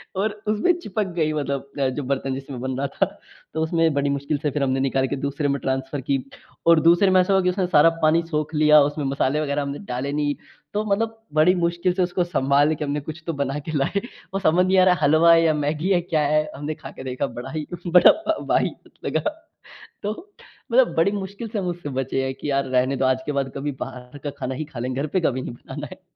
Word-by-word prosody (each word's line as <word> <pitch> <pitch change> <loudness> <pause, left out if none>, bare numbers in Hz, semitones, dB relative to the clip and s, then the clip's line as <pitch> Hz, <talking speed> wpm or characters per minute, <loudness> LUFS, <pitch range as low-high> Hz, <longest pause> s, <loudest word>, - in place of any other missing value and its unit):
और 205 +3 0 0.2
उसमें 215 +11 +3
चिपक 210 - -2
गयी 155 -1 +1
मतलब 140 -2 -3
अ, 135 - +2
जो 135 +3 -4
बर्तन 135 0 -2
जिसमें 135 -1 -7
बन 130 0 -3
रहा 140 +1 -1
था - - 0 0.5
तो 160 - -1
उसमें 165 -1 +2
बड़ी 140 0 0
मुश्किल 140 +1 -1
से 150 - +2
फ़िर 145 0 -1
हमने 135 0 +1
निकाल 135 0 +1
के 140 - -2
दूसरे 140 +2 -2
में 140 - 0
ट्रांसफर 135 +1 -2
की 135 +2 0 0.5
और 165 -1 +7
दूसरे 175 +4 +5
में 185 - +5
ऐसा 185 +2 +1
हुआ 190 - +4
कि 180 - +3
उसने 185 0 0
सारा 165 -2 +6
पानी 155 +2 +4
सोख 150 +1 -1
लिया 150 0 +6
उसमें 145 0 0
मसाले 135 +2 0
वग़ैरह 145 -1 -1
हमने 140 0 -4
डाले 130 +3 -2
नहीं। 145 -1 0 0.4
तो 210 - 0
मतलब 225 +2 0 0.2
बड़ी 155 +4 +5
मुश्किल 170 +1 0
से 185 - +1
उसको 180 0 0
सँभाल 145 -2 +2
के 150 - -4
हमने 145 +1 -1
कुछ 155 +3 -8
तो 165 - -1
बना 140 0 -2
के - - -2
लाए 170 +8 0 0.3
और 195 - -1
समझ 180 +1 +3
नहीं 190 +1 +2
आ - - +7
रहा 180 - +5
है - - -8
हलवा 155 +3 +6
है 165 0 +5
या 160 - +3
मैगी 150 +4 -1
है 175 - +2
क्या 170 -3 0
है। 155 +1 +3
हमने 145 +2 -4
खा - - -10
के - - -10
देखा 130 +1 -2
बड़ा 120 - -7
ही 155 -1 -4 0.2
बड़ा 180 +1 +8 0.4
वाहियात - - 0
लगा - - 0 0.8
तो 205 +1 -1 0.6
मतलब 255 +1 +4
बड़ी 165 +5 +4
मुश्किल 200 +3 -5
से 215 - -4
हम 190 - -2
उससे 175 -3 -5
बचे 135 0 -1
हैं 130 - -3
कि 145 - -5
यार 140 0 +1
रहने 130 +1 +1
दो 130 - 0
आज 130 0 +1
के 150 - -1
बाद 135 -2 -2
कभी 145 +1 -2
बाहर 125 +1 -7
का 145 - -2
खाना 130 +1 -3
ही 155 - -4
खा 150 -4 -11
लेंगे 130 +2 -2
घर - - -1
पे - - +4
कभी 130 -6 0
नहीं - - -5
बनाना - - -8
है। - - -12
150 Hz, 245 wpm, -23 LUFS, 135-175 Hz, 0.8 s, बड़ा